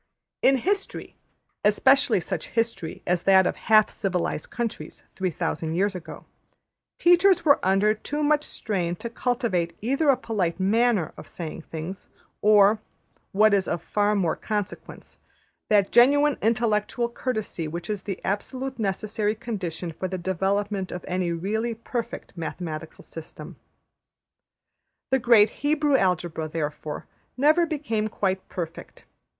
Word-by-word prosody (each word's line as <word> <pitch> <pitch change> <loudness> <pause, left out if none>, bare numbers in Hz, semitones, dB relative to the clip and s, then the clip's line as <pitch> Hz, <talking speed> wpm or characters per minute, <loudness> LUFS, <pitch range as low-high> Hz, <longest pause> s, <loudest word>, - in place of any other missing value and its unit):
In 270 0 +5
history, 395 - -3 0.5
especially 265 +3 +4
such 170 - -4
history 230 -8 -2
as 175 0 +1
that 190 0 +5
of - - 0
half 215 -1 +4
civilised 180 -5 -2
countries 235 -2 -5
3000 165 -3 -2
years 200 +3 +1
ago, 180 -2 -9 0.7
teachers 355 0 +4
were 285 -2 +5
under 195 +3 +3
too 295 +7 -4
much 300 0 +3
strain 180 - -2
to 230 +6 -7
cultivate 230 -10 -1
either 275 +7 +1
a 270 - +5
polite 200 -7 -2
\emph{manner} 210 -1 +2
of - - -10
saying 165 -2 -7
things, 165 +4 -7 0.3
or, 210 0 +5 0.5
what 215 +1 +4
is 195 -2 +2
of 170 -1 -2
far 205 +4 +1
more 180 -5 +1
consequence, 210 -3 -5 0.5
that 205 -2 +3
genuine 285 +4 +5
intellectual 225 +1 +1
courtesy 220 -9 -3
which 170 +3 -6
is 210 -2 -3
the 195 -2 -5
absolutely 255 +5 -3
necessary 210 +1 -1
condition 180 -7 -5
for 175 +4 -4
the 185 0 -4
development 195 +2 -1
of 180 - -6
any 180 -1 -1
really 220 +7 -2
perfect 230 +1 -5
mathematical 160 -2 -6
system. 165 0 -10 1.6
The 265 - +4
great 230 -3 +5
Hebrew 295 0 +2
Algebra, 175 -6 0
therefore, 150 -1 -4 0.3
never 310 +6 +4
became 230 -9 -2
quite 190 -2 -2
perfect. 170 -2 -7
205 Hz, 130 wpm, -25 LUFS, 180-240 Hz, 1.6 s, In